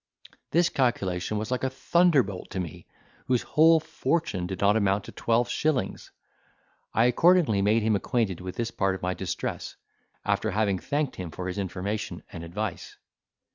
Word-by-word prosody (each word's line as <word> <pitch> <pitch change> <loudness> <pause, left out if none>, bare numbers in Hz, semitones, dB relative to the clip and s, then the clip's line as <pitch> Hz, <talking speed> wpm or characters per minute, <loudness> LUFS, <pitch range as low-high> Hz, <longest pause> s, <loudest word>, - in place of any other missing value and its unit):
This 170 +1 +3
calculation 105 -8 0
was 110 +3 -4
like 125 - -1
a 130 - +2
thunderbolt 135 - +2
to 95 - -4
me, 85 -5 -6 0.4
whose 125 -2 +2
whole 160 +1 +5
fortune 155 - -1
did 95 -1 -5
not 100 +1 +4
amount 100 -2 +2
to - - -10
twelve 115 +1 +1
shillings. 155 -4 -1 0.8
I 115 - +3
accordingly 140 - +4
made 105 +3 +3
him 110 -1 +2
acquainted 100 -3 -1
with 90 0 -6
this 115 -1 -2
part 95 -3 0
of 95 - -10
my 90 0 0
distress, - - -4 0.5
after - - +1
having 100 -3 +1
thanked 145 +3 -2
him 90 -2 -5
for 90 +3 -6
his 90 +2 -3
information 100 +1 -4
and 80 - -7
advice. 95 +4 -5
110 Hz, 165 wpm, -27 LUFS, 95-130 Hz, 0.8 s, whole